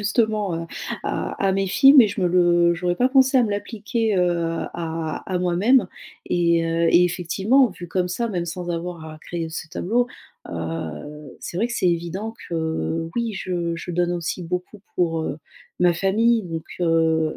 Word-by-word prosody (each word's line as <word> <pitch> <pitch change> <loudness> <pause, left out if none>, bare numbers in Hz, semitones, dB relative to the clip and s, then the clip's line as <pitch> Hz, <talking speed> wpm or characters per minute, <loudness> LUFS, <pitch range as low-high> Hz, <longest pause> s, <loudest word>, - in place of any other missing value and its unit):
justement 210 -3 +1
heu, - - -7 0.4
à - - -2 0.2
à - - +3
mes 195 0 0
filles 270 +8 +6
mais 250 -7 +8
je 200 -1 -3
me - - +3
le 175 -1 +4
j'aurais 175 +1 -1
pas 250 +6 +2
pensé 265 0 +5
à 250 - +6
me 215 - -2
l'appliquer 215 +1 -2
heu, 180 -1 +3 0.4
à 165 -2 -4
à 180 - +1
moi-même, 185 +6 +3 0.4
et 170 -1 +2
heu, 165 0 +1
et 180 +1 +6
effectivement, 190 +9 +2
vu 180 -2 -9
comme 180 +1 -1
ça 230 +6 -2
même 175 -4 -2
sans 175 +1 -5
avoir 170 -1 -4
à 155 -1 -9
créer 165 -1 -5
ce 160 0 -6
tableau 230 +8 0 0.4
heu, 85 - -6
c'est 175 - -5
vrai 230 - +2
que 240 - -6
c'est 180 - +2
évident 175 +6 -3 0.2
que 165 0 -2
oui, 230 -3 -1
je 175 -3 -2
je 175 - -6
donne 175 0 0
aussi 175 +1 -3
beaucoup 180 +4 -5
pour, 165 -2 +1
heu, 150 -2 -3 0.4
ma 175 -1 +5
famille 220 +6 +2
donc 165 -2 -5 0.2
heu, 160 -2 +2
175 Hz, 185 wpm, -23 LUFS, 165-205 Hz, 0.4 s, mais